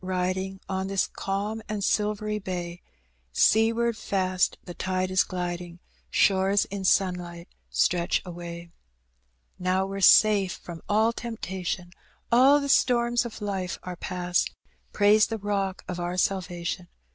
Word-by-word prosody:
Biding, 185 +1 -2
On 190 0 -2
this 195 0 +1
calm 205 +3 -3
and 210 -2 -3
silvery 210 +1 0
bay, 175 -2 -5 0.5
Seaward 230 - +3
fast 185 -4 0
the 175 - -8
tide 185 +1 -2
is 185 - +4
gliding, 175 -1 -5 0.3
Shores 195 0 +3
in 200 -1 -4
sunlight 180 -2 0 0.2
stretch 80 - +1
away. 170 -1 -8 0.9
"Now 185 +1 +1
we're 195 0 -5
safe 200 -2 +6
from 170 -2 -9
all 220 +2 +3
temptation, 190 -6 -5 0.4
All 265 +5 +6
the 280 - -3
storms 240 -3 +3
of 220 -2 -7
life 190 -3 -3
are 180 0 -6
past; 180 0 -1 0.4
Praise 210 +1 +5
the 225 - -3
Bock 195 -2 -2
of 180 -1 -4
our 175 +1 -3
salvation. 180 -1 -2
190 Hz, 130 wpm, -26 LUFS, 180-210 Hz, 0.9 s, safe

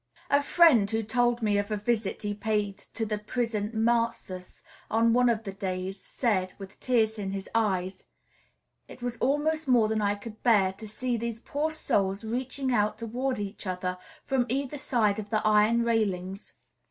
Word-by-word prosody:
A 285 0 +5
friend 285 -9 +5
who 225 +1 0
told 240 +2 +1
me 205 -1 +2
of 205 +1 -2
a 210 - -1
visit 215 -1 -1
he 205 0 -1
paid 205 -1 -1 0.2
to 225 - 0
the 210 -1 -2
Prison 215 -1 -2
Mazas, 225 -5 -1 0.3
on 230 +1 +3
one 245 0 +4
of 225 -1 0
the 195 -3 -6
days, 190 0 -4
said, 190 -7 -1
with 195 -1 -11
tears 220 -3 +1
in 195 -2 -3
his 195 0 -5
eyes, 190 -4 0 0.8
"It 245 - -12
was 245 -1 -3
almost 295 +5 0
more 240 -4 +5
than 220 0 0
I 205 0 +1
could 215 +1 -10
bear 200 -6 +4
to 215 +3 -10
see 245 +3 -2
these 230 0 -4
poor 290 +6 -2
souls 200 -10 0
reaching 260 +3 -2
out 210 -2 +1
toward 250 +4 -2
each 205 0 -5
other 180 0 -3 0.3
from 260 -3 +1
either 275 +3 -2
side 220 -6 +1
of 210 -1 -6
the 215 -1 0
iron 215 +2 +4
railings. 200 -4 -1
220 Hz, 175 wpm, -28 LUFS, 200-240 Hz, 0.8 s, A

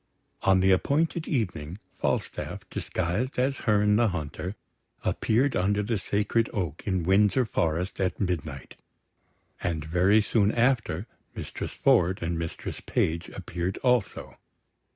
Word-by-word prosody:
On 95 -1 +4
the 95 +1 +4
appointed 155 - +1
evening, 90 - -2 0.2
Falstaff, - - -3
disguised 105 - -2
as 130 +2 +1
Herne 105 0 +4
the 120 0 +4
Hunter, 90 +1 -4 0.5
appeared 125 +4 +2
under 100 +3 +1
the 105 0 -1
Sacred 105 +3 0
Oak 90 -8 -3
in 95 -3 +1
Windsor 105 +7 +4
Forest 90 -1 -1
at 95 -1 0
midnight; 80 -8 -3 0.8
and 80 -3 -2
very 90 +6 +4
soon 105 -1 +2
after 115 -7 +1 0.3
Mistress - - -5
Ford 90 +2 +3
and 85 0 -1
Mistress 80 0 -5
Page 80 +1 0
appeared 90 +2 -4
also. 125 -6 0
95 Hz, 125 wpm, -27 LUFS, 85-110 Hz, 0.8 s, On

